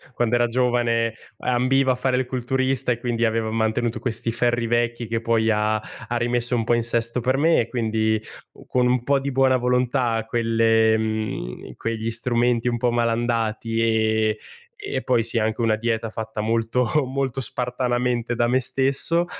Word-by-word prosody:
quando 120 -1 0
era 120 0 +3
giovane 120 -2 +1 0.2
ambiva 130 +2 +2
a - - +1
fare 125 0 0
il 130 - 0
culturista, 130 +1 -1
e 120 - 0
quindi 120 -1 0
aveva 110 -1 0
mantenuto 115 +1 0
questi 115 -1 -2
ferri 120 0 0
vecchi 120 0 0
che 115 0 -2
poi 115 -1 +2
ha 105 0 +1
ha 110 +2 -6
rimesso 120 +1 0
un 115 - 0
po' 115 - +1
in 120 - +2
sesto 115 +1 0
per 130 +3 +1
me, 165 +3 +3
e 115 - 0
quindi 110 -2 0 0.3
u - - -16
con 125 -1 +1
un 125 -1 +1
po' 140 +2 +2
di 140 +1 -3
buona 130 0 +3
volontà, 125 -2 0
quelle, 115 -1 +3
mhmm, 110 - -4
quegli 115 0 -3
strumenti 120 +1 +1
un 120 -1 0
po' 120 +1 +1
malandati 115 -1 0
e 110 -1 +1 0.5
e 410 0 -3
poi 125 -3 +2
sì, 115 +1 -1
anche 110 +1 0
una 115 -2 +2
dieta 115 0 -2
fatta 110 0 -5
molto 115 +2 0 0.2
molto 135 0 -2
spartanamente 125 -2 -1
da 120 0 +1
me 125 +2 +2
stesso, 135 +6 0
120 Hz, 175 wpm, -23 LUFS, 115-125 Hz, 0.5 s, era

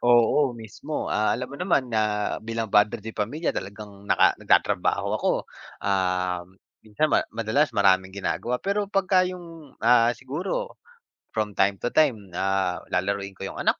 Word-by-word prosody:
Oo, 120 +2 +4
mismo 115 +7 -5
ah, 110 +1 +2
alam 125 +3 -6
mo 140 - -7
naman 140 -10 +1
na 105 -1 0
bilang 115 -1 -4
padre 105 0 +4
de 110 - -6
pamilya 120 +11 -2
talagang, 100 0 -8
naka - - +5
nag-tatrabaho - - +2
ako - - +1 0.6
um, 90 -2 0 0.4
minsan 110 +8 0
ma - - +5
madalas 115 +7 +1
maraming 95 -1 +3
gina-gawa 120 +5 -2
pero 200 +4 -1
pag 195 -2 +1
ka 190 0 +4
yung 165 -5 -10
ah, 120 -1 +5
siguro 175 - -4 0.6
from 105 -2 -2
time 95 0 +2
to - - -2
time 125 -10 +2
ah, 95 -2 0
lalaruin 100 +2 -1
ko 95 0 -6
yung - - -10
anak - - +1
110 Hz, 155 wpm, -25 LUFS, 100-140 Hz, 0.6 s, naka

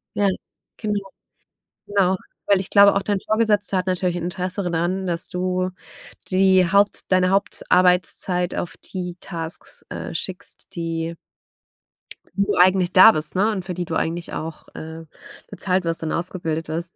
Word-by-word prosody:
Ja, 205 - +2 0.5
genau. 210 -2 -1 0.9
Genau, 190 -2 +2 0.3
weil 200 -2 +4
ich 190 - -4
glaube 200 0 +7
auch, 200 - +2
dein 200 0 -1
Vorgesetzter 210 -2 +1
hat 185 0 -1
natürlich 180 -1 0
Interesse 180 +3 -2
daran, 180 +2 -1
dass 170 -1 -2
du 185 0 -1 0.6
die 185 -1 +4
Haupt 200 0 +2
deine 185 0 +4
Hauptarbeitszeit 180 -2 +2
auf 165 -4 -4
die 180 -2 -6
Tasks, 165 -2 -5
äh, - - -6
schickst, 180 +3 -6
die 165 -1 -3 1.2
wo 200 +1 +1
du - - -2
eigentlich 185 0 +4
da 190 +4 +10
bist, 155 -3 -4
ne, 205 +4 +3
und 195 -4 -3
für 180 -1 -5
die 175 0 -3
du 165 - -4
eigentlich 170 +1 -2
auch, 160 0 -6
äh, 160 +1 -8 0.5
bezahlt 185 -1 0
wirst 165 -1 -2
und 160 - -2
ausgebildet 165 -2 -2
wirst. 170 +4 -5
185 Hz, 150 wpm, -22 LUFS, 170-195 Hz, 1.2 s, da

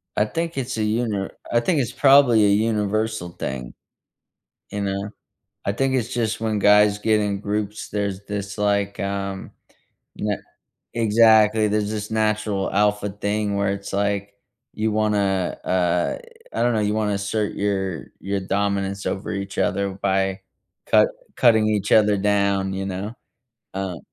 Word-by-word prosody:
I 105 - +3
think 165 +7 -3
it's 130 -2 -3
a 110 - 0
uni 105 -3 -1 0.2
I 120 - +4
think 155 +6 +1
it's 125 -3 -1
probably 135 -4 +5
a - - +4
universal 110 -2 0
thing. 65 -7 -6 1.0
You 100 0 -3
know? 100 +1 -2 0.5
I 100 - 0
think 135 +4 0
it's 125 -1 -1
just 115 -3 -1
when 110 -1 0
guys 105 0 +5
get 110 0 +2
in 100 -1 -1
groups, 105 0 -3
there's 100 -1 -3
this, 100 0 -5
like, 100 -1 0
um, 100 -1 -4 0.6
na 105 -1 -1 0.6
exactly. 110 -1 +5
There's 105 0 0
this 105 -1 -4
natural 105 -2 0
alpha 105 0 +2
thing 105 0 -2
where 100 -1 +1
it's 100 0 -6
like 100 0 -1 0.4
you 110 0 -1
wanna, 100 -4 0
uh, 90 -1 +1 0.3
I - - -1
don't 120 0 +2
know. 110 - +1
You 105 0 0
wanna 105 -1 0
assert 100 +1 -2
your 95 -5 -2
your 100 0 -2
dominance 100 0 -1
over 95 +1 -3
each 100 0 -5
other 100 -1 +1
by 95 0 0 0.5
cut - - +5 0.3
cutting 110 -3 +4
each 105 -2 0
other 105 -1 +5
down, 100 -1 +1
you 95 0 -3
know? 100 +4 -4 0.6
Um 95 -3 -4
105 Hz, 150 wpm, -22 LUFS, 100-110 Hz, 1.0 s, probably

